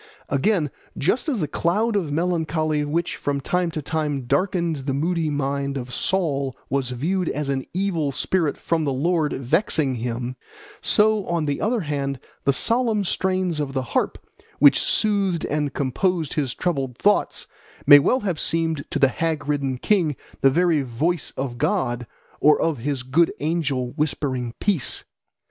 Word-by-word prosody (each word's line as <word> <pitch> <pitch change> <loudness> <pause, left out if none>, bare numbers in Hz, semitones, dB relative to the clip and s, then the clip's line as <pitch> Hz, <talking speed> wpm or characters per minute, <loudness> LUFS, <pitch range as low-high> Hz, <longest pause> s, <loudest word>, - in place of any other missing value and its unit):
Again, 150 +2 +1 0.3
just 235 - +1
as 245 -9 0
the 150 - 0
cloud 210 +10 0
of 175 -8 0
melancholy 155 -2 0
which 160 +4 -1
from 140 -1 -1
time 180 +5 0
to 155 -2 -5
time 150 -2 -1
darkened 170 +3 0
the 135 - 0
moody 165 +2 0
mind 140 -1 -1
of 125 -1 -6
Saul 140 -8 0
was 135 -2 0
viewed 165 +9 -1
as 150 -1 -2
an 135 -1 -2
evil 175 -6 0
spirit 160 +2 0
from 165 -1 0
the 140 - 0
Lord 155 +2 +1
vexing 145 - +1
him, 120 +1 -4 0.4
so 215 -1 +3
on 170 -2 0
the 145 -1 -2
other 225 +1 +1
hand 140 -4 -2 0.3
the 140 - +5
solemn 225 - +1
strains 185 -3 0
of 140 -2 -2
the 130 -1 -1
harp, - - +1 0.4
which 145 0 +6
soothed 200 -6 +1
and 150 -1 -1
composed 160 +4 0
his 135 -5 -1
troubled 135 -8 -2
thoughts, 205 +1 +2 0.4
may 145 - +10
well 255 - +2
have 180 -7 -2
seemed 165 -3 0
to - - -2
the 135 - +5
hag 160 -1 -2
ridden 140 -3 0
king 165 -2 +1 0.3
the 135 - +6
very 165 +1 +2
voice 140 +7 -1
of 125 -3 -3
God 125 - 0 0.3
or 150 0 +5
of 160 -6 0
his 135 0 -2
good 150 +7 +3
angel 145 -6 -1
whispering 130 -5 -2
peace. 195 -9 0
150 Hz, 160 wpm, -23 LUFS, 135-175 Hz, 0.4 s, may